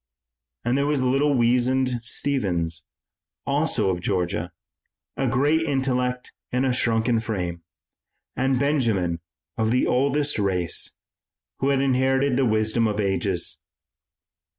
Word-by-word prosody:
And 120 +1 +1
there 140 +1 +1
was 145 -3 +1
little 135 +3 +2
weazened 125 +1 +2
Stephens, 85 - -1 0.6
also 95 - +1
of 90 -1 -3
Georgia, 90 -1 -1 0.6
a 135 - 0
great 145 +6 +2
intellect 125 -4 -1 0.2
in 125 +2 +1
a 130 - +1
shrunken 115 -1 +1
frame, 90 -6 -3 0.7
and 130 0 +1
Benjamin 115 - +1 0.4
of 110 0 +2
the 125 +2 +2
oldest 140 +1 +1
race, 90 -4 -1 0.6
who 135 - +1
had 135 -1 +2
inherited 135 0 +2
the 130 0 +2
wisdom 110 +1 +2
of 105 -1 -2
ages. 95 -2 0
125 Hz, 120 wpm, -24 LUFS, 105-135 Hz, 0.7 s, little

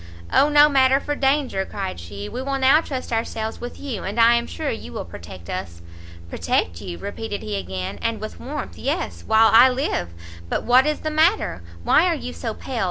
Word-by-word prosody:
"O 290 - +5
no 295 0 +7
matter 270 -2 +4
for 290 - -3
danger," 270 -7 +1
cried 190 - -5
she, 100 +4 -7
"we 255 - -5
will 275 +1 -2
now 270 +4 +5
trust 260 -6 -5
ourselves 225 -1 -3
with 245 0 -7
you, 255 -8 -5
and 205 +5 -3
I 230 +1 +7
am 235 0 +1
sure 310 -3 -3
you 80 - -7
will - - -5
protect 85 +1 -11
us." 85 -2 -6 0.4
"Protect 85 0 -1
you!" 85 - -6
repeated 205 - -5
he 105 -1 -3
again, 95 -1 -5
and 230 -1 -1
with 215 - -7
warmth, 290 +3 -6
"yes, 300 +7 -3
while 220 0 +5
I 240 +3 +8
live! 255 - -1 0.4
but - - -1
what 255 +4 +5
is 300 - -1
the 310 - -2
matter? 320 - +2 0.2
why - - +4
are - - +2
you 80 +1 -6
so 85 - -5
pale? - - -5
230 Hz, 205 wpm, -22 LUFS, -, 0.4 s, I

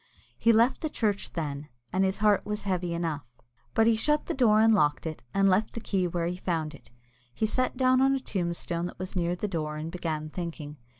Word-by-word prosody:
He 230 - +5
left 230 +3 +3
the 315 - -1
church 210 -7 -1
then, 150 -3 -4 0.2
and 190 +1 +2
his 190 0 +1
heart 210 -1 +3
was 210 0 -3
heavy 180 -3 -1
enough, 165 -4 -2 0.5
but 225 - +5
he 230 0 +4
shut 300 +7 +1
the - - -2
door 225 -5 +4
and 225 0 +6
locked 150 -7 +2
it, 155 -1 -5
and 195 0 +3
left 195 +3 +2
the - - -4
key 190 -5 0
where 170 -1 -2
he 175 +1 -2
found 165 -4 -2
it. 145 - -15 0.5
He 220 - +1
sat 255 +4 0
down 255 0 +4
on 270 0 +4
a - - -1
tombstone 175 -5 -2
that - - -10
was 185 +2 -6
near 175 -1 0
the 210 - -3
door, 155 -5 -3
and 155 +2 -5
began 155 -3 -3
thinking. 160 -4 -6
185 Hz, 225 wpm, -28 LUFS, 165-220 Hz, 0.5 s, and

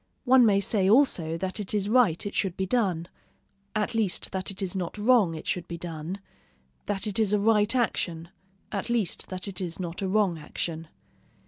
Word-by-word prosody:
One 250 -2 +6
may 200 -2 +4
say 195 -1 +2
also 190 - +3
that 190 +4 -3
it 210 0 -3
is 200 -1 0
right 215 -8 +3
it 205 - -4
should 190 -4 -1
be 190 - 0
done, 185 -6 0 0.7
at 215 +1 0
least 220 -5 0
that 190 -1 -2
it 195 - -6
is 190 -1 -2
not 180 +1 -3
wrong 210 -6 +4
it 155 - -8
should 175 -2 -2
be 170 - -5
done; 165 +2 -6 0.7
that 200 0 0
it 210 0 -1
is 210 -2 +2
a 210 - +3
right 210 +2 +3
action, 170 -8 -1 0.4
at 200 +2 -3
least 230 -6 -1
that 185 +1 -4
it 190 -1 -6
is 175 -1 -4
not 175 0 -5
a 195 - -1
wrong 190 -4 +1
action. 160 +1 -5
195 Hz, 200 wpm, -27 LUFS, 175-215 Hz, 0.7 s, One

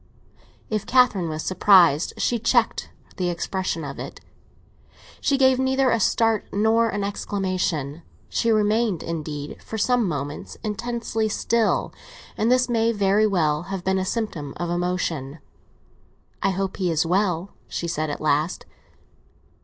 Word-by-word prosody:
If 215 -1 -2
Catherine 230 -9 +3
was 155 0 -4
surprised, 185 -5 +4
she 240 - 0
checked 230 +1 +1 0.3
the 180 -1 0
expression 175 -1 -2
of 140 -1 -6
it; - - -7 1.0
she 275 - +1
gave 260 -1 +4
neither 265 0 +2
a 230 - +2
start 225 0 +2
nor 225 +3 +3
an 205 -1 -2
exclamation. 185 -7 -2 0.3
She 230 - 0
remained, 215 -2 +2
indeed, 150 -3 -5
for 220 - -6
some 240 0 +2
moments 145 -2 -5
intensely 225 0 -2
still, 225 +1 +1 0.4
and 225 +3 +1
this 255 0 +4
may 230 -1 +2
very 205 0 +3
well 155 -6 +1
have 195 -2 -4
been 190 +1 +1
a - - 0
symptom 185 - -3
of 175 -1 -3
emotion. 175 -5 -2 1.0
"I 195 - +2
hope 195 0 -2
he 185 -2 0
was 160 0 +1
well," 185 0 0 0.2
she 170 - -4
said 155 -2 -2
at 145 - -4
last. 155 +3 0
195 Hz, 140 wpm, -23 LUFS, 165-225 Hz, 1.0 s, surprised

